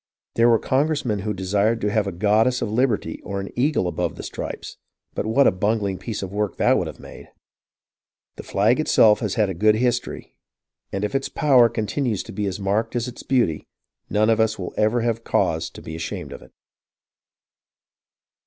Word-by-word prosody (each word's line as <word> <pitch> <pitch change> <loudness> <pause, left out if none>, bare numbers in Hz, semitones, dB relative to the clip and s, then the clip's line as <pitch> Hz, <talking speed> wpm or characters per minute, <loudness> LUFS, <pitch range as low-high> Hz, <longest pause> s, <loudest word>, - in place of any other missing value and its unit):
There 115 +1 +4
were 115 - +5
Congressmen 130 -5 0
who 105 +2 -3
desired 100 +4 0
to 105 - 0
have 105 -1 +1
a - - -2
goddess 110 +7 +2
of 105 - -3
lib 125 +4 +3
erty 105 - -3
or 100 -1 -4
an 95 - -5
eagle 130 - +1
above 90 -1 -2
the - - -8
stripes, - - -6 0.4
but - - -3
what 135 +6 +4
a - - +6
bungling 100 0 -1
piece 110 -4 -5
of 95 - -6
work 105 -2 -2
that - - +3
would - - 0
have - - -9
made! - - -12 1.1
The - - -8
flag 110 +7 +1
itself 110 -8 +4
has 105 -4 -2
had 105 -2 +2
a 95 - -3
good 105 +5 +3
history, 125 +1 -2 0.6
and 100 - -3
if 105 - -4
its 135 0 -1
power 130 -6 +4
continues 115 0 -2
to - - -10
be 105 -1 -2
as 95 +1 -4
marked 105 +4 -1
as 120 +1 -1
its 125 - -8
beauty, 120 - 0 0.4
none 110 +2 +2
of 115 - +2
us 110 -1 +2
will 90 -3 -6
ever 110 +3 +2
have 115 -1 -1
cause - - 0
to - - -13
be 80 - -7
ashamed 80 - -5
of - - -10
it. - - -17
110 Hz, 200 wpm, -22 LUFS, 100-120 Hz, 1.1 s, a